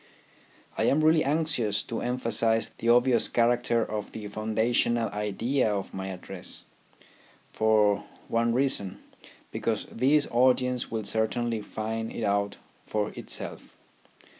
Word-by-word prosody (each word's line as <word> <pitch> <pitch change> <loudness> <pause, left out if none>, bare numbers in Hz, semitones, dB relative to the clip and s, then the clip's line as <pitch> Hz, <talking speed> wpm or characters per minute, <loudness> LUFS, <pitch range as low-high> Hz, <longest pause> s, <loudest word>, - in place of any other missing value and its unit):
I - - +2
am 155 +3 +3
really 155 0 +5
anxious 140 -9 0
to 115 - -4
emphasize 115 -2 +1
the 115 - -3
obvious 120 0 +4
character 120 -1 +2
of 105 -1 -5
the 105 -2 -6
foundational 110 +2 +1
idea 105 +4 0
of 100 -2 -3
my 95 0 -4
address; 95 -1 -6 0.9
for 105 -2 +3 0.2
one 115 0 +1
reason, 120 -7 0 0.5
because 110 -2 -2
this 140 +5 +3
audience 125 0 +2
will 110 -1 -3
certainly 110 +2 -1
find 110 +2 -4
it 115 - -5
out 100 0 0 0.3
for 105 -1 -1
itself. - - -5
115 Hz, 120 wpm, -27 LUFS, 105-125 Hz, 0.9 s, really